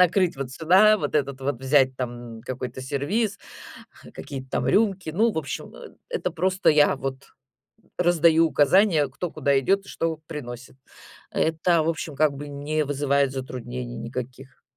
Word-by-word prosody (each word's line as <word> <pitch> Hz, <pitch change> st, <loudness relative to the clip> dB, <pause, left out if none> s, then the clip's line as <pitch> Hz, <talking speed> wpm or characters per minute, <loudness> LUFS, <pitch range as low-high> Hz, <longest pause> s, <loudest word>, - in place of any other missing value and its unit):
накрыть 180 Hz, -1 st, +3 dB
вот 135 Hz, -2 st, -5 dB
сюда, 190 Hz, +9 st, +5 dB
вот -, -, -3 dB
этот 140 Hz, -2 st, 0 dB
вот 135 Hz, -2 st, -2 dB
взять 130 Hz, -1 st, +3 dB
там 120 Hz, -2 st, -6 dB
какой-то 125 Hz, 0 st, -6 dB
сервиз, 180 Hz, -, -1 dB, 0.8 s
какие-то 130 Hz, -2 st, -7 dB
там 125 Hz, -, -1 dB
рюмки. 195 Hz, 0 st, +1 dB
Ну, 220 Hz, +8 st, +2 dB
в 160 Hz, -, -2 dB
общем, 140 Hz, -5 st, -6 dB
э, -, -, -12 dB
это 180 Hz, -, -2 dB
просто 185 Hz, +3 st, +2 dB
я 150 Hz, -2 st, +4 dB
вот 135 Hz, 0 st, -6 dB, 0.7 s
раздаю 165 Hz, -2 st, +4 dB
указания, 160 Hz, +1 st, +3 dB
кто 155 Hz, +6 st, -5 dB
куда 140 Hz, -2 st, +1 dB
идёт 195 Hz, +8 st, +1 dB
и -, -, -13 dB
что 165 Hz, -1 st, -2 dB
приносит. 125 Hz, -3 st, -8 dB, 0.6 s
Это, 165 Hz, +1 st, +1 dB
в 160 Hz, -, 0 dB
общем, 160 Hz, -2 st, -4 dB
как 150 Hz, 0 st, +3 dB
бы 145 Hz, +1 st, -7 dB
не 145 Hz, +2 st, -2 dB
вызывает 140 Hz, -1 st, +1 dB
затруднений 125 Hz, -2 st, -6 dB
никаких. 125 Hz, +3 st, -7 dB
145 Hz, 155 wpm, -24 LUFS, 130-170 Hz, 0.8 s, сюда